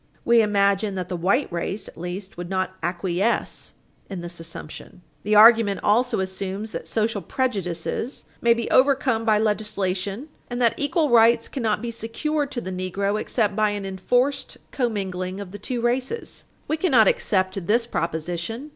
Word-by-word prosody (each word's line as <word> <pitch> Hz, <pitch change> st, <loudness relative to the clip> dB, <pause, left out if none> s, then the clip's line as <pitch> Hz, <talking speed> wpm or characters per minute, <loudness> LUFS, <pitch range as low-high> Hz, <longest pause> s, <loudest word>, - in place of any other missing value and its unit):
We 235 Hz, -1 st, +6 dB
imagine 200 Hz, -1 st, +2 dB
that 180 Hz, -2 st, -4 dB
the 180 Hz, -, -2 dB
white 190 Hz, -, +1 dB
race, 180 Hz, +4 st, -3 dB
at -, -, -12 dB
least, 180 Hz, +3 st, -6 dB
would 175 Hz, 0 st, -6 dB
not 185 Hz, -1 st, -1 dB
acquiesce 180 Hz, +5 st, -1 dB, 0.3 s
in 190 Hz, -3 st, -5 dB
this 175 Hz, 0 st, -7 dB
assumption. 165 Hz, +1 st, -9 dB, 0.2 s
The 210 Hz, +4 st, +1 dB
argument 220 Hz, -2 st, +7 dB
also 240 Hz, +3 st, +2 dB
assumes 190 Hz, +3 st, -4 dB
that -, -, -6 dB
social 220 Hz, -2 st, -1 dB
prejudices 205 Hz, -, -3 dB, 0.2 s
may 235 Hz, 0 st, +4 dB
be 235 Hz, -1 st, -3 dB
overcome 255 Hz, -4 st, +3 dB
by 215 Hz, -2 st, +4 dB
legislation, 210 Hz, +2 st, -2 dB, 0.2 s
and 245 Hz, 0 st, -3 dB
that 235 Hz, -2 st, +4 dB
equal 290 Hz, 0 st, 0 dB
rights 230 Hz, 0 st, +5 dB
cannot 225 Hz, -4 st, -1 dB
be 235 Hz, -, -3 dB
secured 285 Hz, +6 st, -2 dB
to 240 Hz, -, -3 dB
the 185 Hz, -, -5 dB
negro 195 Hz, +3 st, -1 dB
except 210 Hz, -4 st, 0 dB
by 215 Hz, 0 st, +3 dB
an 205 Hz, -1 st, -4 dB
enforced 245 Hz, +9 st, 0 dB
commingling 190 Hz, -6 st, -2 dB
of 200 Hz, -3 st, -7 dB
the 205 Hz, -, -8 dB
two 240 Hz, +4 st, -3 dB
races. 255 Hz, -, -2 dB, 0.2 s
We 310 Hz, -, 0 dB
cannot 265 Hz, -, +4 dB
accept 185 Hz, -2 st, 0 dB
this 230 Hz, +2 st, +3 dB
proposition. 175 Hz, -, -3 dB
210 Hz, 160 wpm, -24 LUFS, 185-235 Hz, 0.3 s, argument